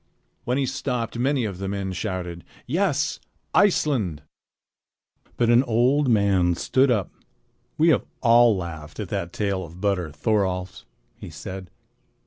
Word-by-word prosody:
When 125 Hz, +2 st, 0 dB
he 140 Hz, -, +1 dB
stopped, 125 Hz, -3 st, -3 dB
many 130 Hz, -1 st, +1 dB
of 95 Hz, -4 st, -5 dB
the 95 Hz, -, -3 dB
men 95 Hz, -1 st, -3 dB
shouted: 90 Hz, -3 st, -4 dB, 0.2 s
"Yes! 155 Hz, 0 st, 0 dB, 0.3 s
Iceland!" 125 Hz, -, +2 dB, 1.1 s
But 120 Hz, -1 st, +3 dB
an 120 Hz, +1 st, +6 dB
old 130 Hz, +3 st, +2 dB
man 100 Hz, -5 st, +3 dB
stood 130 Hz, +9 st, +2 dB
up. 105 Hz, -6 st, 0 dB, 0.7 s
"We 160 Hz, +2 st, +4 dB
have 145 Hz, -, +3 dB, 0.2 s
all 115 Hz, -2 st, +5 dB
laughed 80 Hz, -4 st, -7 dB
at -, -, -4 dB
that 85 Hz, 0 st, -3 dB
tale 100 Hz, -2 st, -1 dB
of 85 Hz, +1 st, -11 dB
Butter 95 Hz, -4 st, 0 dB
Thorolf's," 95 Hz, 0 st, -1 dB, 0.3 s
he -, -, -9 dB
said. 95 Hz, +4 st, -8 dB
105 Hz, 135 wpm, -24 LUFS, 90-125 Hz, 1.1 s, an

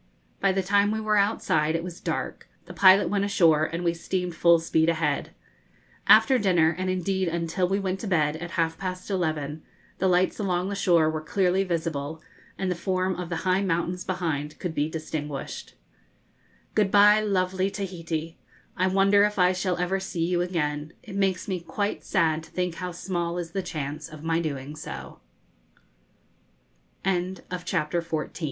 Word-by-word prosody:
By 195 Hz, -, +3 dB
the 190 Hz, 0 st, 0 dB
time 200 Hz, +2 st, +3 dB
we 220 Hz, +1 st, -1 dB
were 215 Hz, -1 st, +1 dB
outside 160 Hz, -6 st, +2 dB
it 165 Hz, -, -1 dB
was 175 Hz, -1 st, -7 dB
dark, -, -, -4 dB, 0.2 s
the -, -, -10 dB
pilot 190 Hz, +1 st, +6 dB
went 200 Hz, -1 st, 0 dB
ashore, 165 Hz, -6 st, +4 dB
and 165 Hz, +2 st, -4 dB
we 170 Hz, -1 st, +2 dB
steamed 180 Hz, +1 st, -3 dB
full 170 Hz, 0 st, +5 dB
speed 160 Hz, 0 st, +1 dB
ahead. 155 Hz, -3 st, 0 dB, 0.8 s
After 260 Hz, -3 st, +7 dB
dinner, 175 Hz, -5 st, +3 dB
and 185 Hz, +1 st, -2 dB
indeed 185 Hz, 0 st, 0 dB
until 170 Hz, +2 st, -1 dB
we 195 Hz, +2 st, 0 dB
went 190 Hz, -1 st, -2 dB
to 220 Hz, -, -5 dB
bed, 155 Hz, -5 st, +2 dB
at 175 Hz, +2 st, -6 dB
half 165 Hz, -1 st, 0 dB
past 185 Hz, +1 st, -5 dB
eleven, 155 Hz, -5 st, -2 dB, 0.4 s
the 190 Hz, -, +2 dB
lights 180 Hz, +3 st, +2 dB
along 185 Hz, -2 st, 0 dB
the 200 Hz, -, -3 dB
shore 170 Hz, -5 st, +3 dB
were 155 Hz, 0 st, -1 dB
clearly 185 Hz, +3 st, +1 dB
visible, 160 Hz, -4 st, -3 dB, 0.4 s
and 190 Hz, -1 st, -1 dB
the -, -, 0 dB
form 185 Hz, +1 st, -1 dB
of 180 Hz, -2 st, -5 dB
the 170 Hz, +1 st, -4 dB
high 185 Hz, +1 st, +3 dB
mountains 180 Hz, -1 st, -1 dB
behind 155 Hz, -5 st, -3 dB
could 175 Hz, -3 st, -4 dB
be 150 Hz, 0 st, 0 dB
distinguished. 150 Hz, -3 st, -5 dB, 1.0 s
Good 210 Hz, -2 st, +2 dB
bye, 210 Hz, +2 st, +6 dB
lovely 190 Hz, -2 st, 0 dB
Tahiti! 170 Hz, -5 st, -5 dB, 0.4 s
I 185 Hz, -, +1 dB
wonder 195 Hz, +2 st, +4 dB
if 210 Hz, 0 st, +1 dB
I 180 Hz, 0 st, +4 dB
shall 180 Hz, -1 st, -1 dB
ever 180 Hz, +2 st, 0 dB
see 180 Hz, -3 st, -2 dB
you 175 Hz, 0 st, +1 dB
again; 155 Hz, -3 st, -2 dB
it 210 Hz, -5 st, -9 dB
makes 195 Hz, -2 st, 0 dB
me 185 Hz, -3 st, -2 dB
quite 205 Hz, +4 st, -3 dB
sad 160 Hz, -5 st, +1 dB
to 160 Hz, -, -15 dB
think 180 Hz, -1 st, -2 dB
how 180 Hz, 0 st, -3 dB
small 175 Hz, -1 st, -3 dB
is 170 Hz, -2 st, -4 dB
the 195 Hz, -, -2 dB
chance 155 Hz, -3 st, -5 dB
of 155 Hz, -1 st, -11 dB
my 165 Hz, 0 st, +1 dB
doing 145 Hz, -3 st, -4 dB
so. 155 Hz, -, -8 dB
180 Hz, 170 wpm, -26 LUFS, 160-190 Hz, 1.0 s, After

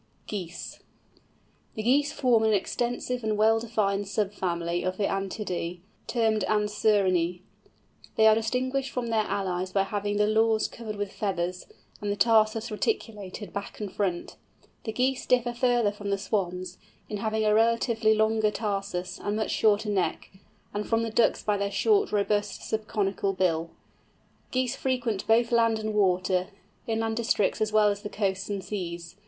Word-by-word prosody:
GEESE. 180 Hz, -4 st, -6 dB, 1.0 s
The 215 Hz, -, -3 dB
Geese 280 Hz, +5 st, +3 dB
form 245 Hz, -4 st, +3 dB
an 220 Hz, -1 st, +3 dB
extensive 245 Hz, +4 st, -1 dB
and 215 Hz, -1 st, 0 dB
well 220 Hz, +1 st, +4 dB
defined 205 Hz, -3 st, -1 dB
sub 205 Hz, 0 st, -1 dB
family 170 Hz, -2 st, -1 dB
of 185 Hz, 0 st, -2 dB
the 210 Hz, -, -1 dB
Anatidæ 195 Hz, -3 st, -2 dB, 0.3 s
termed 220 Hz, -3 st, +1 dB
Anserinæ. 200 Hz, -5 st, +2 dB, 0.7 s
They 220 Hz, -, +4 dB
are 220 Hz, -, +8 dB
distinguished 255 Hz, +4 st, -1 dB
from 245 Hz, -2 st, -3 dB
their 220 Hz, -1 st, +2 dB
allies 185 Hz, -2 st, -2 dB
by 195 Hz, 0 st, +2 dB
having 205 Hz, +1 st, -2 dB
the 210 Hz, -, +4 dB
lores 220 Hz, +1 st, +3 dB
covered 220 Hz, -2 st, -6 dB
with 205 Hz, -1 st, -4 dB
feathers, 180 Hz, -3 st, -2 dB, 0.3 s
and 205 Hz, 0 st, -1 dB
the -, -, 0 dB
tarsus 220 Hz, +1 st, +3 dB
reticulated 210 Hz, -, -3 dB
back 200 Hz, 0 st, -6 dB
and 205 Hz, -3 st, -5 dB
front. 185 Hz, -4 st, -2 dB, 0.5 s
The 220 Hz, -, -2 dB
Geese 255 Hz, +3 st, 0 dB
differ 245 Hz, -1 st, +2 dB
further 240 Hz, -3 st, +2 dB
from 205 Hz, 0 st, -6 dB
the 200 Hz, -, +1 dB
Swans, 185 Hz, -2 st, -3 dB, 0.3 s
in 210 Hz, -, -4 dB
having 220 Hz, +1 st, -1 dB
a 210 Hz, -, +4 dB
relatively 225 Hz, 0 st, +3 dB
longer 220 Hz, 0 st, +2 dB
tarsus, 195 Hz, -4 st, -3 dB
and 205 Hz, 0 st, -2 dB
much 220 Hz, 0 st, -1 dB
shorter 210 Hz, 0 st, +2 dB
neck; 195 Hz, -3 st, -1 dB, 0.4 s
and 205 Hz, +1 st, -3 dB
from 225 Hz, 0 st, +2 dB
the 225 Hz, -, -3 dB
Ducks 230 Hz, +1 st, +2 dB
by 210 Hz, -1 st, +1 dB
their 200 Hz, 0 st, -1 dB
short, 405 Hz, -, +2 dB
robust, 205 Hz, 0 st, 0 dB
subconical 205 Hz, -2 st, -1 dB
bill. 170 Hz, -3 st, 0 dB, 0.8 s
Geese 255 Hz, 0 st, 0 dB
frequent 250 Hz, -7 st, -1 dB
both 230 Hz, +1 st, +3 dB
land 230 Hz, -1 st, +3 dB
and 215 Hz, 0 st, -3 dB
water, 185 Hz, -2 st, +2 dB, 0.4 s
inland 225 Hz, 0 st, -1 dB
districts 220 Hz, -2 st, +1 dB
as 215 Hz, 0 st, +1 dB
well 215 Hz, -1 st, +5 dB
as 200 Hz, 0 st, -2 dB
the 205 Hz, -, -5 dB
coasts 195 Hz, -2 st, -2 dB
and 200 Hz, -2 st, -3 dB
seas. 175 Hz, -3 st, -5 dB
210 Hz, 160 wpm, -27 LUFS, 195-225 Hz, 1.0 s, are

